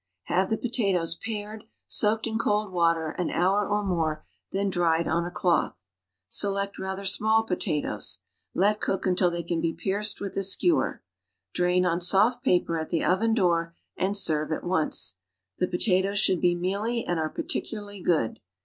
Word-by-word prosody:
Have 185 +2 +1
the 220 - +1
potatoes 195 -9 0
pared, 210 +2 -6 0.2
soaked 220 +1 +2
in 220 -1 -2
cold 210 -2 0
water 165 -3 +1
an 180 - 0
hour 195 +3 +1
or 205 0 +1
more, 160 -5 -1 0.3
then 195 0 0
dried 170 -2 +1
on 170 +1 0
a - - -3
cloth. 170 - 0 0.4
Select 200 - -2
rather 190 +1 -4
small 220 +3 +2
potatoes. 180 -7 -2 0.3
Let 210 +3 +2
cook 195 - -1
until 180 -1 +3
they 170 0 -4
can 170 0 -2
be 165 0 0
pierced 205 +2 -1
with 200 -1 -5
a 195 - +1
skewer; 325 - +1 0.5
drain 180 +1 +2
on 170 0 +1
soft 215 +7 +3
paper 175 -7 +2
at 160 - -5
the 165 - 0
oven 220 +5 +2
door, 170 -5 +1 0.2
and 200 +2 0
serve 155 -5 +1
at 155 - -2
once. 160 - 0 0.4
The 180 - +2
pota 180 +1 +2
toes 200 +2 -2
should 185 -3 +2
be 175 0 +3
mealy 200 +7 -1
and 175 -2 -1
are 155 -1 -1
particularly 205 +1 -4
good. 155 -11 +1
185 Hz, 170 wpm, -27 LUFS, 170-205 Hz, 0.5 s, until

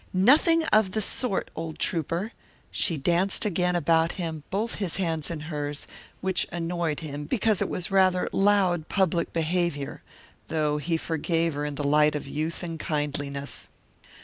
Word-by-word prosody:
"Nothing 300 - +5
of 210 -3 +4
the 220 - +1
sort, 215 0 -1
old 160 -1 -5
Trouper!" 170 +5 -1 0.4
She 165 - +1
danced 175 +9 +2
again 180 -2 +1
about 165 0 +3
him, 165 -4 -4
both 215 +4 -1
his 185 -5 -1
hands 165 -5 -1
in 165 -3 -4
hers, 145 -2 -4 0.4
which 190 -1 0
annoyed 170 -2 -2
him 145 -2 -5
because 220 - +1
it - - 0
was 185 +3 -3
rather 185 -2 +3
loud 195 -5 +2
public 180 -4 +1
behaviour, 165 -3 -1 0.5
though 150 -1 0
he 165 +3 0
forgave 165 0 0
her 145 +1 -2
in 145 -1 -3
the 145 - -3
light 150 +1 +4
of 150 - -3
youth 155 +5 -3
and 165 -2 -5
kindliness. 140 - -2
165 Hz, 155 wpm, -26 LUFS, 150-185 Hz, 0.5 s, Nothing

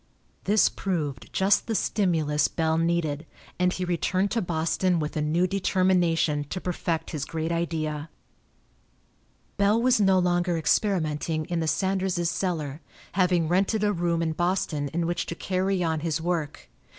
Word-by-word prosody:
This 210 +2 +4
proved 150 -10 -3
just 195 +1 +2
the 225 - -1
stimulus 160 -9 +1
Bell 160 -1 0
needed, 165 -2 0 0.3
and 180 0 +3
he 185 0 -3
returned 185 +3 0
to 230 - +1
Boston 175 +1 0
with 150 0 -3
a 155 - 0
new 160 +4 +2
determination 180 -5 +1
to 185 - -5
perfect 175 -2 -3
his 150 -4 -3
great 160 +2 -3
idea. 160 -2 -2 1.5
Bell 205 +2 +3
was 245 -2 +3
no 195 -1 +4
longer 175 -1 +1
experimenting 160 -3 0
in 175 +1 -2
the 160 - -1
Sanderses' 190 -1 0
cellar, 160 -5 -3 0.3
having 180 -3 +2
rented 195 +5 +1
a 205 0 +2
room 170 -2 0
in 160 - 0
Boston 175 -4 -1
in 165 +4 -2
which 175 +1 -2
to 170 - -4
carry 185 +1 -1
on 160 -2 0
his 160 0 -1
work. 160 -3 -3
170 Hz, 150 wpm, -26 LUFS, 160-185 Hz, 1.5 s, This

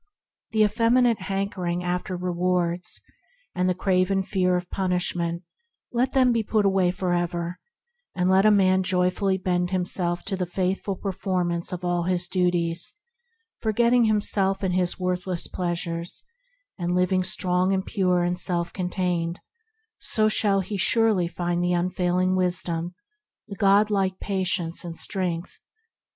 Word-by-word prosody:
The 220 -1 +3
effeminate 230 +2 +3
hankering 190 -3 -2
after 180 +1 -2
rewards, 180 0 -1 0.5
and 180 0 +1
the 180 - +1
craven 190 +1 +1
fear 185 -2 +1
of 180 0 -4
punishment, 175 -2 -1 0.5
let 250 +2 0
them 260 -2 +4
be 230 -1 +2
put 215 -1 +1
away 190 -2 +3
for 180 0 -1
ever, 175 0 -2 0.6
and 180 0 +1
let 190 +1 +4
a 215 - +6
man 190 -2 +4
joyfully 185 +1 +1
bend 180 -1 0
himself 180 -1 -1
to 195 - -2
the 185 -1 -2
faithful 190 +2 -1
per 195 +1 -3
formance 180 -2 -2
of 180 0 -5
all 175 -1 0
his 180 -1 -1
duties, 175 - 0 0.6
forgetting 235 +2 +3
himself 200 -2 +1
and 185 -2 0
his 180 0 0
worthless 180 -1 -1
pleasures, 170 -1 -3 0.6
and 175 0 -1
living 185 +1 +2
strong 180 0 0
and 190 0 0
pure 180 -4 +1
and 175 +1 -1
self 175 -1 -1
contained; 180 -2 -2 0.6
so 215 -1 +2
shall 205 -2 +2
he 200 +2 -4
surely 215 -3 +3
find 175 0 -2
the 180 0 +1
Unfailing 180 +1 +1
Wisdom, 175 -1 -1 0.5
the 200 - -7
God 200 +2 +4
like 190 -2 0
Patience 185 -4 -1
and 170 -1 -7
strength. 180 -3 -3
180 Hz, 140 wpm, -25 LUFS, 175-195 Hz, 0.6 s, a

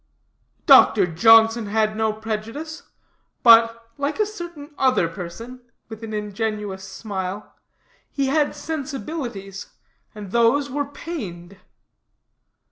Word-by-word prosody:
"Doctor 200 -4 +7
Johnson 225 +5 +5
had 215 +1 0
no 220 0 +1
prejudice; 225 +9 -6 0.6
but, 230 0 +6
like 285 +7 -2
a 425 - +3
certain 345 -8 -9
other 255 -11 +2
person," 195 +9 -9 0.3
with 220 0 -10
an 225 - -6
ingenuous 210 -2 -4
smile, 190 0 -6 0.6
"he 275 - -2
had 290 +2 +1
sensibilities, 255 - -6 0.5
and 205 -3 -9
those 235 +5 +2
were 285 +1 -1
pained." 200 - -8
225 Hz, 105 wpm, -22 LUFS, 205-280 Hz, 0.6 s, Doctor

